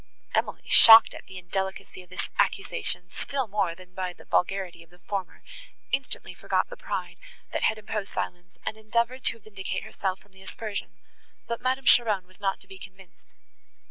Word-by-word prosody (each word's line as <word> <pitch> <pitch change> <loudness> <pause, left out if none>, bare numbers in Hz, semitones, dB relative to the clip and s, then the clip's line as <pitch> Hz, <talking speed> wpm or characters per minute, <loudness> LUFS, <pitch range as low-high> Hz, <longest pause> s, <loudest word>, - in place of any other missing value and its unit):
Emily, - - 0
shocked 225 0 +10
at - - -11
the 190 - -10
indelicacy 190 +1 -4
of 180 - -18
this 185 - -4
accusation, 130 - +1
still 275 -2 -2
more 195 -5 0
than 185 0 -16
by 185 -1 -3
the - - -17
vulgarity 180 -2 0
of 165 - -17
the 175 - -20
former, 190 0 -5 0.5
instantly 270 0 -2
forgot - - 0
the - - -6
pride, - - -5 0.4
that - - -1
had 220 - +2
imposed 210 -1 -4
silence, 180 +1 -5
and 220 - -3
endeavoured 235 +4 -1
to - - +3
vindicate 200 -3 -5
herself 190 -2 -3
from 205 +1 -25
the 190 0 -17
aspersion, 205 +2 -5 0.6
but 235 0 -3
Madame 260 +1 0
Cheron 215 -7 +5
was 185 0 -19
not 195 -1 -1
to - - -15
be 190 - -12
convinced. 190 -1 -16
195 Hz, 175 wpm, -27 LUFS, 185-220 Hz, 0.6 s, shocked